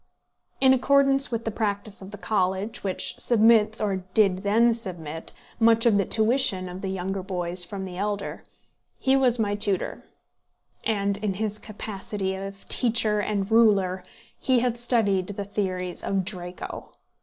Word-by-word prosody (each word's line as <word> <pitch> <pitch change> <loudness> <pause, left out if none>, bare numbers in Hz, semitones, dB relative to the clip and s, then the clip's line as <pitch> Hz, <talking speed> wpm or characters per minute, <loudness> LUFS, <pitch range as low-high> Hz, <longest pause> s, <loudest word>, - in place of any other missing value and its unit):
In 265 -1 +6
accordance 275 +1 +3
with 230 -1 -3
the 225 - -1
practice 205 -1 -3
of 190 - -9
the 205 - -9
college, 195 0 -1
which 190 -2 -3
submits, 220 -2 +4
or 200 -3 0 0.2
did 195 -4 +3
then 230 +4 +3
submit, 170 -8 -4 0.3
much 230 0 +4
of 215 -4 +4
the 200 - +1
tuition 220 -4 +2
of 180 +1 -8
the 195 - -3
younger 190 +1 -3
boys 180 -1 -2
from 190 +2 -6
the 180 -1 -7
elder, 205 0 -3 0.5
he 265 0 +2
was 255 -3 +3
my 210 -3 0
tutor; 205 -2 -1 0.8
and 200 -2 0
in 205 -2 -2
his 210 +1 -3
capacity 205 -2 -5
of 195 +1 -8
teacher 220 -3 +2
and 205 -1 -2
ruler, 195 -5 +3 0.4
he 255 -2 +2
had 240 -1 -1
studied 210 -7 +1
the 200 0 -5
theories 185 -3 -3
of 195 -2 -1
Draco. 180 -2 -7
205 Hz, 155 wpm, -25 LUFS, 190-225 Hz, 0.8 s, In